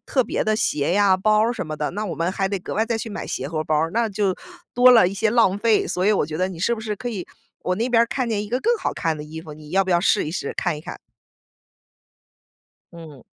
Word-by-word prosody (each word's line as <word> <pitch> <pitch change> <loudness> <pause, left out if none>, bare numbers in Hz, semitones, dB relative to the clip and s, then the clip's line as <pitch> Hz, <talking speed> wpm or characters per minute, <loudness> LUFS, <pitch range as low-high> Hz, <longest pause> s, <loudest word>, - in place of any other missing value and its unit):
特 260 -3 +1
别 - - -1
的 215 0 +1
鞋 150 -4 0
呀、 200 -2 +4
包 215 +3 +2
儿 230 - +1
什 205 - -5
么 155 0 -5
的， 150 0 -2
那 210 +4 -4
我 170 - -4
们 170 +4 -1
还 195 0 -1
得 200 - -2
格 180 - -7
外 220 - +2
再 230 0 -1
去 225 0 -5
买 205 - -5
鞋 - - -4
和 155 +1 -2
包 155 0 0
儿， 160 +2 0
那 230 0 +1
就 200 -2 0 0.4
多 250 +1 +7
了 225 -7 +6
一 185 - -2
些 220 +2 +1
浪 215 -4 +3
费， 225 0 +2
所 180 - -2
以 210 - +4
我 200 - +1
觉 155 - -5
得 185 +1 +1
你 180 - -8
是 235 +7 +1
不 225 - -8
是 215 -2 -4
可 245 - -5
以 195 -6 -5 0.4
我 185 - 0
那 230 +6 -1
边 230 -1 +5
儿 235 - +1
看 255 -1 -2
见 210 -2 0
一 210 - -7
个 245 - 0
更 475 +2 +2
好 - - -2
看 165 -3 -1
的 150 - -7
衣 155 +2 -8
服， 155 - -10
你 150 0 -13
要 195 +1 +2
不 185 - -3
要 175 - +3
试 195 -1 +2
一 - - -3
试、 175 - -4
看 175 -4 -1
一 - - -9
看？” - - -8 2.0
嗯。 160 -6 -12
195 Hz, 305 characters per minute, -22 LUFS, 165-220 Hz, 2.0 s, 多